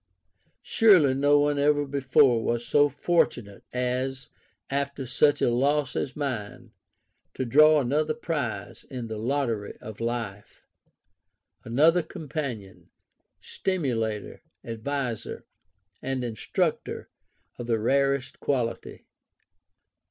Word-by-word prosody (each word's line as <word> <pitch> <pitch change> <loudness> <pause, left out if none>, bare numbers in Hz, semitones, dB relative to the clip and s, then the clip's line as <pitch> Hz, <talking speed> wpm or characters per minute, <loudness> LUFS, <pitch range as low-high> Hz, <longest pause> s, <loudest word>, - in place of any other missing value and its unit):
Surely 185 -12 +5
no 145 +2 +4
one 145 0 +1
ever 145 0 +3
before 135 -4 +3
was 120 0 -1
so 145 +3 +4
fortunate, 125 - 0
as, 130 +2 -2 0.4
after 140 0 -2
such 145 +4 +2
a - - +3
loss 140 +2 +1
as 135 - -3
mine, 130 -8 -5 0.6
to 130 - -2
draw 150 +5 +6
another 150 +4 0
prize 155 -1 -4
in 125 -4 -7
the 110 -1 -5
lottery 115 -4 -2
of 110 -1 -10
life 115 -4 -5 0.5
[ 90 0 -50
another 155 +9 +3
companion, 140 - -6 0.5
stimulator, 120 - -2 0.2
adviser, 120 +1 -4 0.6
and 135 -1 -2
instructor 115 -3 -2 0.5
of 120 - -5
the 115 -1 +2
rarest 135 +3 0
quality]. 125 -5 -3
135 Hz, 105 wpm, -26 LUFS, 115-145 Hz, 0.6 s, draw